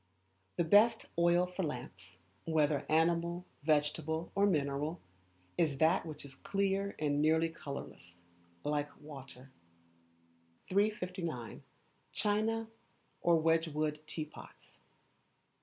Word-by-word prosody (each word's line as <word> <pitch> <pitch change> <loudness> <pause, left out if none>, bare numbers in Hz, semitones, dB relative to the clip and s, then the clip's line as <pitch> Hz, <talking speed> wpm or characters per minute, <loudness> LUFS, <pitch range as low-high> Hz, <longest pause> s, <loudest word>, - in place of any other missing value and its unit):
The 170 - +2
Best 215 +7 +5
Oil 175 +1 +4
for 180 +1 -5
Lamps, 95 - -6 0.3
whether 155 -3 +1
animal, 170 +2 +2 0.2
vegetable, 155 +2 0
or 200 +1 +4
mineral, 150 -1 0 0.6
is 155 -5 +2
that 160 +2 +3
which 155 -2 -7
is 140 - -8
clear 195 +5 -1
and 145 -1 +1
nearly 160 +2 +3
colourless, 140 - -8 0.4
like 145 0 0
water. 135 -3 -11 1.2
359. 180 - -1 0.5
China 220 +2 +1 0.5
or 170 -1 +5
Wedgwood 155 -2 +1
Teapots. 155 -1 -8
160 Hz, 95 wpm, -34 LUFS, 145-180 Hz, 1.2 s, Best